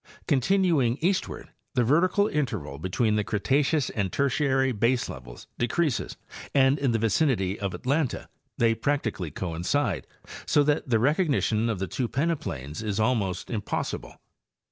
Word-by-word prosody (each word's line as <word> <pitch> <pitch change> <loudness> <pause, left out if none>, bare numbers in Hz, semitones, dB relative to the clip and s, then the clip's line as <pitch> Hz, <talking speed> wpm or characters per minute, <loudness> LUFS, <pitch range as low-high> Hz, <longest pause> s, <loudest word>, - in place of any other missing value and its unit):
Continuing 145 -4 +2
eastward, 185 +3 -1 0.3
the 125 - +3
vertical 180 - +3
interval 105 - -3
between 105 +6 0
the 105 - +1
Cretaceous 135 +8 +1
and 100 -4 -2
Ter 140 0 +1
tiary 135 -1 +1
baselevels 100 - -2
decreases 135 +3 0 0.4
and 135 +1 +4
in 135 - +1
the 115 - +2
vicinity 115 - +1
of 100 -2 -3
Atlanta 140 +1 -1 0.3
they 115 -1 +3
practically 115 - -1
coincide, 90 - -2 0.4
so 145 - +4
that 145 -2 0
the 115 - +4
recognition 130 - +1
of 110 - -1
the 95 - -2
two 125 +6 -2
peneplains 105 - -2
is 105 -1 -2
almost 110 -5 0
impossible. 105 -4 -3
120 Hz, 135 wpm, -26 LUFS, 100-145 Hz, 0.4 s, and